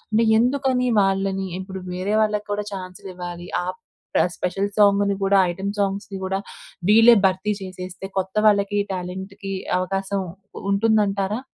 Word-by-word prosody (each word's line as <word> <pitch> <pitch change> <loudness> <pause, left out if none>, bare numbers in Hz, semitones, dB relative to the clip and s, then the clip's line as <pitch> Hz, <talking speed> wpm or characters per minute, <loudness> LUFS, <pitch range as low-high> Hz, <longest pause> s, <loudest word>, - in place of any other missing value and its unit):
అంటే, 225 +2 +3
ఎందుకని 255 +1 +2 0.2
వాళ్ళని 195 0 0
ఇప్పుడు 190 0 -7
వేరే 185 +3 -1
వాళ్ళకి 210 -1 0
కూడా 205 0 -1
చాన్స్‌లివ్వాలి. 180 -2 -7
ఆ! - - -4 0.5
ప్ర - - +5
స్పెషల్ 195 +3 -1
సాంగుని 200 -1 +4
కూడా, 195 0 +4
ఐటెమ్ 195 +3 -3
సాంగ్స్‌ని 200 0 -2
కూడా, 190 +1 -1 0.5
వీళ్ళే 225 +3 +8
భర్తీ 190 +2 0
చేసేస్తే 185 0 -7
కొత్త 190 0 -2
వాళ్ళకి 205 -1 +3
టాలెంట్‌కి 190 +2 -6 0.2
అవకాశం 195 +1 -1 0.5
ఉంటుంది 220 +2 +3
అంటారా? 195 +3 -1
195 Hz, 130 wpm, -23 LUFS, 190-205 Hz, 0.5 s, వీళ్ళే